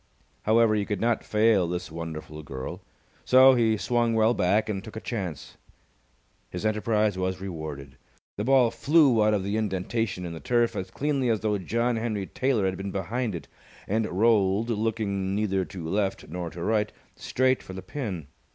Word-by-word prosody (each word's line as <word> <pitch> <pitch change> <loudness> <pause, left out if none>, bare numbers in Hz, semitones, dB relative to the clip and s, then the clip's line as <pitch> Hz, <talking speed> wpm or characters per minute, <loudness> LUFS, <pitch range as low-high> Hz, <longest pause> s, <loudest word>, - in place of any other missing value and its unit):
However, 110 0 +4
he 105 -1 +1
could 105 0 -3
not 115 0 +1
fail 105 -4 +3
this 90 -1 -4
wonderful 80 -2 -6
girl, 65 -3 -7 0.4
so 130 +1 +7
he 115 -3 +2
swung 115 +3 +1
well 110 +1 +4
back 105 +1 +2
and 100 -3 -3
took 110 -1 -10
a - - -3
chance. 95 - -5 0.9
His 90 +4 -5
enterprise 105 -2 +1
was 95 0 -1
rewarded. 80 -8 -7 0.4
The 105 - -3
ball 125 -1 +4
flew 135 -3 +4
out 105 0 +3
of 100 - -1
the 100 +2 -1
indentation 100 -1 -2
in 85 - -5
the 80 - -7
turf 120 +1 +1
as 95 0 -4
cleanly 140 -1 0
as 110 -2 +1
though 105 -2 0
John 115 +5 0
Henry 110 -4 -2
Taylor 125 -2 0
had 95 -1 -1
been 100 +1 -4
behind 105 +3 -2
it, 80 - -7 0.4
and 110 +2 0
rolled, 105 +2 +2
looking 105 -3 -1
neither 95 -2 0
to 85 0 -7
left 100 +2 -1
nor 85 +1 -4
to 85 +1 -7
right, 105 0 +1 0.2
straight 130 0 +1
for 95 - -10
the 95 0 -7
pin. 100 - -5
105 Hz, 180 wpm, -26 LUFS, 95-115 Hz, 0.9 s, so